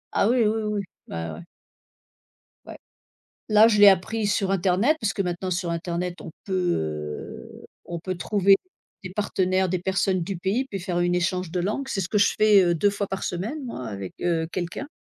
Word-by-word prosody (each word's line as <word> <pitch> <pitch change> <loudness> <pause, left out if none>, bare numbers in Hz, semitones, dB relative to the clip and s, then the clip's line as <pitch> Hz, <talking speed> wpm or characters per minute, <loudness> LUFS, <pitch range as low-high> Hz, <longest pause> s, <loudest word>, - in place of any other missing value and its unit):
Ah, 200 - +3
oui, 240 -3 +3
oui, 220 +1 +1
oui. 210 -1 -1 0.3
Bah, 80 -1 -5
ouais. 85 +2 -9 1.2
Ouais. - - -9 0.7
Là, 215 +1 +7
je 210 - +2
l'ai 205 0 +9
appris 205 +3 +2
sur 195 -1 0
internet 195 - +2
puisque 205 -2 -1
maintenant 180 0 -2
sur 175 -1 -1
internet 170 +1 -3
on 170 - -8
peut, 195 - -6 0.2
heu, 75 -1 -6 0.2
on 170 -1 -5
peut 185 +3 -4
trouver 195 +2 +4 0.5
des 185 - -7
partenaires, 190 -2 0
des 185 0 0
personnes 190 0 0
du 190 +3 -4
pays 195 +9 0
puis 200 -7 -6
faire 175 -1 -2
une 175 0 +1
échange 180 0 -1
de 180 +1 -1
langue, 215 +9 -2
c'est 195 - -1
ce 180 - -3
que 210 - +1
je 200 - +4
fais, 210 -2 +6
heu, 175 -1 +2
2 200 +5 +2
fois 200 0 -3
par 195 0 -5
semaine 215 - -3
moi 180 - -6
avec, 100 -3 -6
heu, 165 -2 +1
quelqu'un. 175 +10 -4
185 Hz, 195 wpm, -25 LUFS, 175-205 Hz, 1.2 s, l'ai